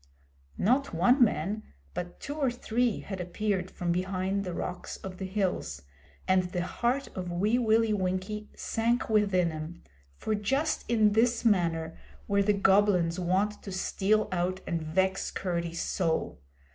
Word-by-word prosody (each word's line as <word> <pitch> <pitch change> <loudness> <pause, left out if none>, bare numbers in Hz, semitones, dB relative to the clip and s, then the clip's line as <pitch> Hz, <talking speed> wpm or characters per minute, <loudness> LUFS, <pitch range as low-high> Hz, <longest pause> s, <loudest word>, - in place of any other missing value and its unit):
Not 255 0 +2
one 245 - +5
man 210 0 0 0.3
but 175 0 -5
two 285 - -5
or 290 -3 +1
three 240 -1 0
had 195 -2 -5
appeared 185 +1 -1
from 175 -2 -2
behind 190 +2 -1
the 180 - -4
rocks 180 0 -5
of 185 -1 -8
the 190 - -3
hills, 180 - -2 0.4
and 185 -1 +3
the 175 -1 -1
heart 245 +8 -1
of 180 -2 -4
Wee 210 +8 +2
Willie 225 -1 +3
Winkie 190 +2 -2
sank 235 +2 0
within 195 -5 +3
him, 155 +2 -7 0.3
for 215 - -2
just 270 +10 0
in 215 -3 +4
this 230 +3 +2
manner 165 -6 +1 0.3
were 200 0 +3
the 205 +1 +3
Goblins 195 -3 +3
wont 190 +4 0
to 195 - -7
steal 200 +3 +1
out 185 +1 -1
and 170 -2 -2
vex 190 +5 0
Curdie's 170 -2 -2
soul. 165 - -1
190 Hz, 150 wpm, -29 LUFS, 180-215 Hz, 0.4 s, one